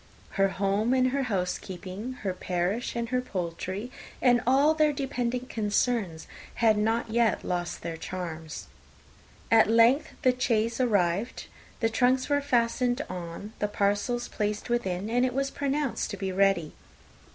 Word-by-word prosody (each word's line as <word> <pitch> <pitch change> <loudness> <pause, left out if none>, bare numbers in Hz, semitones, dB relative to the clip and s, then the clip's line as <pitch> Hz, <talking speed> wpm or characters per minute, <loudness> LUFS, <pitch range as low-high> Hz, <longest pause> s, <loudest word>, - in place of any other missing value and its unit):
Her 195 0 +3
home 200 +6 +1
and 255 0 +3
her 275 +2 0
housekeeping, 190 +3 -3
her 190 -2 -1
parish 185 +7 -2
and 235 -1 -2
her 250 0 +1
poultry, 190 +1 -4 0.3
and 245 -2 +4
all 280 +4 +5
their 310 -1 +3
dependent 250 -3 -2
concerns, 210 -6 0 0.3
had 225 -2 +4
not 225 +2 0
yet 235 -1 +2
lost 175 -1 -3
their 165 -1 -4
charms. 160 -3 -6 0.9
At 225 -2 +6
length 230 +6 +4
the 255 -2 +4
chaise 230 -1 0
arrived, 200 -2 +1 0.4
the 225 - +3
trunks 255 +4 +2
were 285 0 +2
fastened 245 -1 +1
on, 180 +4 -7
the 210 - +1
parcels 205 +4 0
placed 210 +1 -3
within, 195 -5 -1
and 245 +2 +2
it 255 -1 0
was 275 0 0
pronounced 280 -1 -1
to 200 - -5
be 190 0 -3
ready. 190 -4 +2
225 Hz, 145 wpm, -28 LUFS, 190-250 Hz, 0.9 s, At